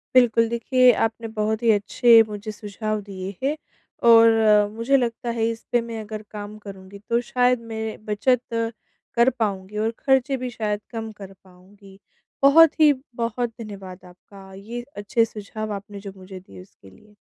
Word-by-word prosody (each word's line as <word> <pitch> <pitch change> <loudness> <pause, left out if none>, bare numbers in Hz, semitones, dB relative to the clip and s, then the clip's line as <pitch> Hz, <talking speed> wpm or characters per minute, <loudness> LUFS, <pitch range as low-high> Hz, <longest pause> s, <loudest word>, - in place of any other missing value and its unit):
बिल्कुल 230 -2 +5
देखिए, 250 +2 +4
आपने 225 +1 -2
बहुत 220 +1 -2
ही 230 - +5
अच्छे 225 +3 +5
मुझे 210 0 -6
सुझाव 215 0 -4
दिए 195 -1 -7
हैं, 285 +3 +1 0.5
और 225 -3 +6
मुझे 230 +5 +1
लगता 235 -1 -2
है 225 - +1
इस 230 0 -6
पे 240 - +3
मैं 230 -1 -6
अगर 215 0 -7
काम 210 0 -8
करूँगी 195 0 -11
तो 235 - +2
शायद 250 0 +1
मैं 220 -1 -5
बचत 230 +4 +1 0.7
कर 235 +2 +5
पाऊँगी 200 -2 -3
और 220 +1 0
खर्चे 265 0 +2
भी 255 0 -4
शायद 210 -3 -3
कम 225 -1 -5
कर 195 0 -9
पाऊँगी। 195 +1 -19 0.4
बहुत 315 +4 +6
ही 305 -1 +7 0.2
बहुत 235 +1 -2
धन्यवाद 195 -4 -9
आपका 190 +2 -15
ये 230 +5 -7 0.2
अच्छे 205 +3 +1
सुझाव 215 0 -6
आपने 200 0 -8
जो 200 0 -8
मुझे 185 0 -10
दिए 95 - -14
उसके 95 +1 -18
लिए। 210 - -21
215 Hz, 165 wpm, -23 LUFS, 200-235 Hz, 0.7 s, ही